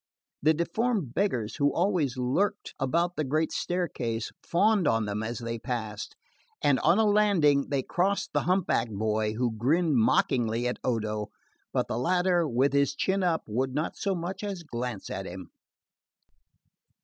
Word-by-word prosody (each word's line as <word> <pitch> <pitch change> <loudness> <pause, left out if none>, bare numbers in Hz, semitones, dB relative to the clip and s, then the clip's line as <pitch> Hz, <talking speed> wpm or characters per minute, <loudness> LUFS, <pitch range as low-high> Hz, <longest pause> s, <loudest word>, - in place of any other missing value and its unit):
The 155 +2 +4
deformed 175 - -1
beggars 125 - -1
who 145 -1 +3
always 170 -7 0
lurked 130 +11 0
about 170 +6 +1
the 155 - +1
great 155 +3 0
staircase 125 -11 -2
fawned 195 0 +2
on 115 -1 +2
them 105 +1 -3
as 115 +1 -3
they 115 -1 -4
passed, 110 -4 -4 0.4
and 145 -3 +3
on 170 +4 +4
a 220 - +4
landing 195 -10 +3
they 140 -3 0
crossed 195 +6 0
the - - +3
humpbacked 165 - +1
boy, 110 +1 0
who 120 -1 -1
grinned 150 +6 +2
mockingly 115 0 +2
at 125 - -3
Odo; 110 -3 -1 0.4
but - - 0
the 110 - -2
latter, 180 +3 +2
with 135 +2 +1
his 140 0 +2
chin 195 +5 0
up, 170 -3 +1
would 130 +4 -2
not 155 +2 -1
so 195 -2 -1
much 175 +4 -5
as 195 -4 -4
glance 120 -7 -5
at 95 0 -4
him. 90 +1 -9
140 Hz, 160 wpm, -28 LUFS, 115-180 Hz, 0.4 s, The